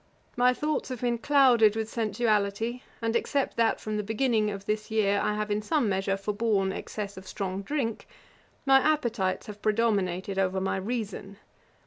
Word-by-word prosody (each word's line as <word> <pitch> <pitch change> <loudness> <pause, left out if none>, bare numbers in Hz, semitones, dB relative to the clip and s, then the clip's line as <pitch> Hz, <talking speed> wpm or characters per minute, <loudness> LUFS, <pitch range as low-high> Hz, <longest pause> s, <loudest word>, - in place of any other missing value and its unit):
My 250 +1 +4
thoughts 300 +3 -2
have 255 -3 -5
been 240 -1 0
clouded 245 -6 +5
with 220 -1 -2
sensuality; 220 +1 0 0.2
and, 225 0 0
except 280 +3 0
that 230 -1 +2
from 215 0 -3
the - - 0
beginning 220 0 +1
of 200 -1 -6
this 215 +1 -2
year 205 -2 +2
I 210 - 0
have, 210 0 -2
in 205 +1 0
some 280 +2 +1
measure, 195 0 0
forborne 205 -1 0
excess 200 0 -6
of 190 0 -10
strong 190 0 -3
drink, 230 -1 -3 0.6
my 270 -1 +7
appetites 235 -11 0
have 210 -1 -9
predominated 200 -4 0
over 190 0 +1
my 190 0 -1
reason. 200 -2 -4
215 Hz, 165 wpm, -28 LUFS, 200-235 Hz, 0.6 s, my